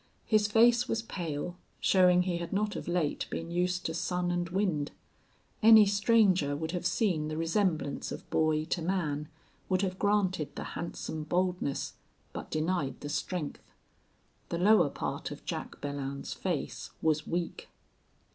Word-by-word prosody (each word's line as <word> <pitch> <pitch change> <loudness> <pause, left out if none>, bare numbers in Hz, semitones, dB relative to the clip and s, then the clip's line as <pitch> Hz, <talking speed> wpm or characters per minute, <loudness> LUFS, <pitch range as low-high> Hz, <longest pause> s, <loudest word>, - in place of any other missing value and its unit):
His 215 -2 +3
face 235 +3 +5
was 225 -3 -1
pale, 175 -4 -4 0.2
showing 180 -1 +5
he 180 -2 -1
had 170 -1 -5
not 210 +1 0
of - - -5
late 175 -4 0
been 165 +1 -5
used 180 +1 0
to 160 - -1
sun 180 +1 -1
and 175 -1 -1
wind. 170 -6 0 0.7
Any 220 -1 +9
stranger 200 -7 +3
would 160 +2 -3
have 180 0 -1
seen 175 -9 +1
the 155 0 -4
resemblance 165 -3 0
of - - -7
boy 155 -1 +2
to 170 +1 -2
man 155 -4 -1 0.4
would 185 0 +2
have 185 -1 -2
granted 190 -7 +1
the - - -4
handsome 160 -2 -5
boldness, 180 -4 -1 0.4
but - - -6
denied 155 -4 -1
the 145 - -5
strength. 155 +1 -3 0.9
The 170 - -1
lower 195 -3 +5
part - - -4
of - - -9
Jack - - -5
Belllounds's 140 -1 -4
face - - -3
was 155 -1 +1
weak. 170 0 -3
175 Hz, 150 wpm, -30 LUFS, 155-195 Hz, 0.9 s, Any